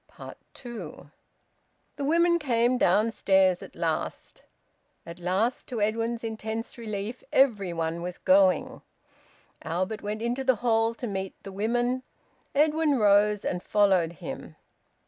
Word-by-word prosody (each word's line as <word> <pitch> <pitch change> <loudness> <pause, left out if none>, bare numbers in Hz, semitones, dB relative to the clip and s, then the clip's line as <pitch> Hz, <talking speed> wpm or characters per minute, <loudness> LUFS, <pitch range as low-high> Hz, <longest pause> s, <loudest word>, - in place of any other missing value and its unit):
TWO. 205 - -9 0.8
The 285 - -5
women 340 +3 +3
came 245 -3 +1
downstairs 190 -2 +3
at - - -11
last. - - -3 0.6
At 170 +1 -9
last, 190 +8 -1
to 245 -4 -4
Edwin's 225 +2 -1
intense 220 0 -4
relief, 215 0 -5
every 215 -9 +3
one 165 0 -2
was 180 0 -5
going. 190 0 +3 0.8
Albert 185 +6 -3
went 210 +2 -4
into 245 +3 -1
the 260 -1 +3
hall 225 0 +2
to 245 - -6
meet 195 -3 -4
the 195 - -8
women. 240 +5 0 0.5
Edwin 300 0 +3
rose 210 -1 +3
and 180 - -2
followed 190 -6 +2
him. 165 - -8
215 Hz, 125 wpm, -27 LUFS, 190-240 Hz, 0.8 s, women